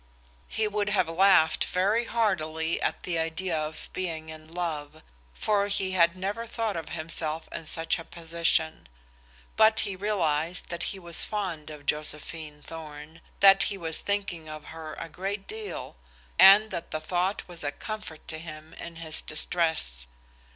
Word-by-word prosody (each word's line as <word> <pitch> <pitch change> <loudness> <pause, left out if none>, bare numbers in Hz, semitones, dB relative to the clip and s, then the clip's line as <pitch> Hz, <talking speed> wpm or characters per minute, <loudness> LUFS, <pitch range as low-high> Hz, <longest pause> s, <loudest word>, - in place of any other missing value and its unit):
He 220 -1 0
would 210 0 0
have 190 -4 +2
laughed 175 -1 +5
very 205 +6 +1
heartily 165 -8 0
at - - -1
the 170 -2 -1
idea 165 +2 -1
of 155 0 -3
being 165 -4 -3
in 155 0 -10
love, 155 -3 -4 0.3
for 205 -1 +1
he 195 -2 0
had 170 -1 +4
never 205 +5 -3
thought 225 -2 -2
of 165 -2 -5
himself 160 0 -3
in 160 - -6
such 165 +2 -1
a - - -6
position. 165 - -1 0.7
But 220 0 +6
he 195 - -2
realized 175 -5 0
that 170 - -3
he 195 - -4
was 170 -3 +2
fond 185 -8 -3
of 150 -2 -10
Josephine 150 0 -1
Thorn, 160 0 -9 0.2
that 195 0 +8
he 200 - -3
was 165 -3 +1
thinking 185 -6 -2
of 155 0 -7
her 160 -1 -7
a 165 - -6
great 195 +5 -4
deal, 435 -1 -6 0.4
and 200 +3 +9
that 170 - -4
the 155 - -2
thought 180 +5 -1
was 175 -3 -7
a 145 - -1
comfort 210 -2 -7
to 155 -1 -3
him 155 -1 -9
in 170 0 -8
his 160 -1 0
distress. 155 - +1
165 Hz, 160 wpm, -28 LUFS, 155-195 Hz, 0.7 s, and